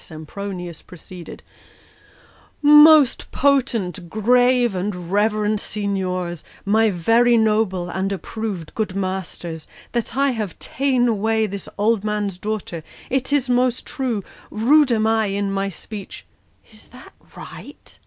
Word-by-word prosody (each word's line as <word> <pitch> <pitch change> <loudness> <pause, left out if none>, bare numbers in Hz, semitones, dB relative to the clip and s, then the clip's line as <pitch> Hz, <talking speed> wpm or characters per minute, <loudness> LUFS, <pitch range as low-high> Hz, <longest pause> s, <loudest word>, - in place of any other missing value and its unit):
Sempronius 175 +2 -7
proceeded 180 0 -11 0.6
" - - -29
'Most 295 -1 +7
potent, 230 -11 0
grave, 245 +2 +3
and 180 -2 -4
reverend 210 +1 +1
signiors, 185 -5 -3 0.2
My 220 +2 +3
very 230 +6 +3
noble 210 -5 +1
and 190 +2 -2
approv'd 200 -3 -5
good 210 -4 -3
masters, 185 -4 -4 0.2
That 235 0 -3
I 275 0 +3
have 215 -7 -4
ta'en 260 -3 0
away 220 0 +1
this 200 -2 -6
old 210 0 +1
man's 210 -3 -2
daughter. 205 -6 -4 0.3
It 265 +1 -1
is 285 -3 +2
most 250 0 +1
true; 245 -7 -3 0.3
rude 270 +5 +3
am 220 -2 +2
I 220 -1 +2
in 200 0 -2
my 195 0 -1
speech 200 +1 -9 0.2
" - - -30
Is 215 - -15
that 255 +2 -15 0.2
right - - -12
210 Hz, 130 wpm, -21 LUFS, 190-240 Hz, 0.6 s, Most